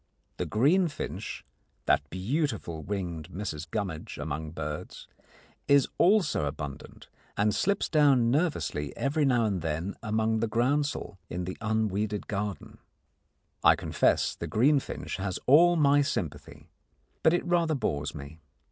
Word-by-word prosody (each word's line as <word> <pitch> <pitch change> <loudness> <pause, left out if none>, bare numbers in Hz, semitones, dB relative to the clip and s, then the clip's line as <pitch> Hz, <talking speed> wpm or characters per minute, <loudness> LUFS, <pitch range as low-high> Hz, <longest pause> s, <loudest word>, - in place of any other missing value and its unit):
The - - -2
green 155 - +3
finch 145 - -6 0.4
that 70 0 +2
beautiful 100 - -2
winged 85 -3 -4
Mrs 85 -4 -5
Gummidge 95 -7 -4
among 75 +1 -4
birds 75 -1 -6 0.6
is 140 -2 +5
also 190 - +3
abundant, 70 -1 -7 0.3
and 105 +1 +2
slips 200 - +1
down 140 -6 +4
nervously 140 - -1
every 145 +2 +1
now 120 -4 +3
and 100 -5 -1
then 80 +5 -2
among 110 0 0
the 115 - 0
groundsel 125 -2 0
in 90 +1 -3
the 95 +1 -5
unweeded 110 -2 -1
garden. 100 -1 -4 0.8
I - - +7
confess - - +1
the - - -5
greenfinch 135 0 +1
has 95 -1 -3
all 170 +6 +6
my 145 -2 +4
sympathy, 95 - -4 0.5
but 160 - +5
it 175 - 0
rather 170 -3 +2
bores 75 - -2
me. 75 +2 -9
105 Hz, 130 wpm, -28 LUFS, 85-140 Hz, 0.8 s, I